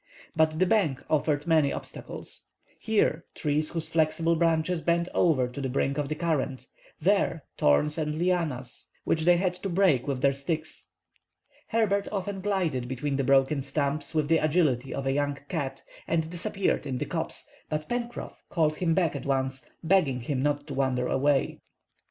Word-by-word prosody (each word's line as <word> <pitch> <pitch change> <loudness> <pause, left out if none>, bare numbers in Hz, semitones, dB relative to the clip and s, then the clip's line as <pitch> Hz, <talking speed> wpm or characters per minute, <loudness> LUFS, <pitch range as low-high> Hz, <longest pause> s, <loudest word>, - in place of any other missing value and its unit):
But 155 0 +3
the 185 - +4
bank 175 - +1
offered 150 -1 +1
many 160 -4 +3
obstacles. - - -6 0.3
Here, 205 -7 +1
trees 150 0 0
whose 165 -2 -3
flexible 165 +1 +2
branches 165 +1 +1
bent 170 +1 +1
over 140 -8 +3
to 125 +3 -7
the 135 - -2
brink 140 +2 0
of 145 -1 -2
the 155 - -1
current; 140 -6 -1 0.3
there, 175 -3 +2 0.2
thorns 150 - +3
and 150 -1 -1
lianas 160 -8 -1 0.2
which 160 -1 0
they 175 0 +6
had 180 0 +1
to 185 +2 -5
break 175 -9 +3
with 135 -3 -2
their 140 0 +5
sticks. 155 +3 -4 0.8
Herbert 205 -3 +1
often 195 -1 -3
glided 175 -11 0
between 135 +3 -2
the 140 - +1
broken 135 +2 +3
stumps 145 +3 -1
with 155 -2 +2
the 165 +1 +4
agility 150 -5 +1
of 135 - -3
a 135 - +2
young 145 0 0
cat 145 -6 -3 0.2
and 160 -1 +1
disappeared 185 -2 -1
in 130 -2 -2
the - - -2
copse, - - -4 0.2
but 150 0 -2
Pencroff 240 0 -4
called 155 -3 +1
him 165 -3 +1
back 175 -5 +1
at - - -5
once, 135 -1 -1 0.2
begging 160 -8 +2
him 130 +2 -2
not 145 0 0
to 145 - -6
wander 130 -2 0
away. 140 0 +1
155 Hz, 170 wpm, -27 LUFS, 140-170 Hz, 0.8 s, they